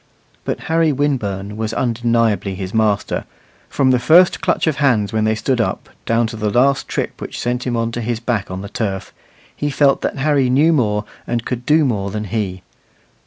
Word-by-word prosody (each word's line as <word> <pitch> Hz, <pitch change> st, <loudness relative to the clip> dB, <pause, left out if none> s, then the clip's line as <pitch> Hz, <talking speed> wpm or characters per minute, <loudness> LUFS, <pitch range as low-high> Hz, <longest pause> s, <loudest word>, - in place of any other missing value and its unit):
But -, -, -3 dB
Harry 165 Hz, -1 st, +2 dB
Winburn 105 Hz, -8 st, -2 dB
was 110 Hz, 0 st, -3 dB
undeniably 115 Hz, -5 st, 0 dB
his 95 Hz, 0 st, -6 dB
master; 110 Hz, -3 st, 0 dB, 0.4 s
from 135 Hz, -2 st, +2 dB
the 125 Hz, -, +3 dB
first 170 Hz, +9 st, +5 dB
clutch -, -, +1 dB
of 155 Hz, -3 st, 0 dB
hands 120 Hz, -9 st, +2 dB
when 110 Hz, -1 st, +1 dB
they 110 Hz, 0 st, +2 dB
stood 120 Hz, +2 st, 0 dB
up, -, -, -3 dB, 0.2 s
down 115 Hz, +1 st, +2 dB
to 110 Hz, 0 st, -5 dB
the 105 Hz, -1 st, -1 dB
last 135 Hz, +5 st, +2 dB
trip -, -, -3 dB
which -, -, -6 dB
sent 125 Hz, +1 st, -2 dB
him 120 Hz, -1 st, 0 dB
on 115 Hz, 0 st, -1 dB
to 120 Hz, -, -4 dB
his 115 Hz, 0 st, -2 dB
back 115 Hz, -4 st, -2 dB
on 95 Hz, +1 st, -5 dB
the -, -, -6 dB
turf, 100 Hz, -4 st, -4 dB, 0.4 s
he 145 Hz, -, -2 dB
felt 140 Hz, -1 st, +3 dB
that -, -, -2 dB
Harry 140 Hz, -2 st, +2 dB
knew 150 Hz, +6 st, +4 dB
more 105 Hz, -7 st, +1 dB, 0.2 s
and 120 Hz, -1 st, -2 dB
could 125 Hz, -1 st, -4 dB
do 155 Hz, 0 st, +4 dB
more 100 Hz, -6 st, -1 dB
than 105 Hz, +1 st, -4 dB
he. 95 Hz, -3 st, -3 dB
115 Hz, 200 wpm, -19 LUFS, 105-135 Hz, 0.4 s, first